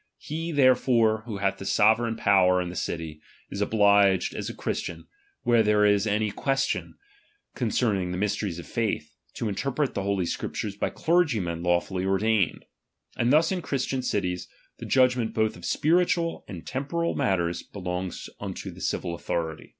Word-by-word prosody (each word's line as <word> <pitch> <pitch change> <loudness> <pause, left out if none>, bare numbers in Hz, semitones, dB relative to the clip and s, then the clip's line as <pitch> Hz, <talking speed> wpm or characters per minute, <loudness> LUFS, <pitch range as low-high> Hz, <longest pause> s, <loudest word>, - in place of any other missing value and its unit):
He 165 +3 -5
therefore, 125 -5 +3
who 110 -4 -4
hath 100 0 -1
the 95 - -7
sovereign 115 +2 +3
power 95 -4 +4
in 90 -1 -2
the 90 - -8
city, 80 -4 -4 0.3
is 100 - -4
obliged 100 -2 +4
as - - -4
a - - -5
Christian, - - -4 0.4
where 120 -1 +4
there 105 -1 +3
is 105 +1 +3
any 105 0 +1
question 135 +5 -1 0.6
concerning 105 -6 0
the 90 - -3
mysteries 100 -2 -1
of 85 - -8
faith, - - -2 0.2
to 115 - -2
in 105 - -1
terpret 135 +6 -1
the - - -2
Holy 100 -2 0
Scriptures 100 +3 -4
by - - -1
clergymen 120 - +1
lawfully 90 +1 0
ordained. 95 +1 +1 0.5
And 120 - +1
thus 160 +4 +4
in 185 -2 -1
Christian 135 -3 -2
cities, 90 -7 -2 0.3
the - - -7
judg 130 -1 +4
ment 115 -2 -2
both 110 -2 +1
of 85 - -10
spiritual 170 +1 +1
and 90 -4 -8
temporal 145 +6 -2
matters 85 -3 0
be 100 - -11
longs 90 0 -4
unto - - -6
the - - -12
civil 85 - -2
authority. 80 -1 -4
105 Hz, 165 wpm, -26 LUFS, 95-125 Hz, 0.6 s, power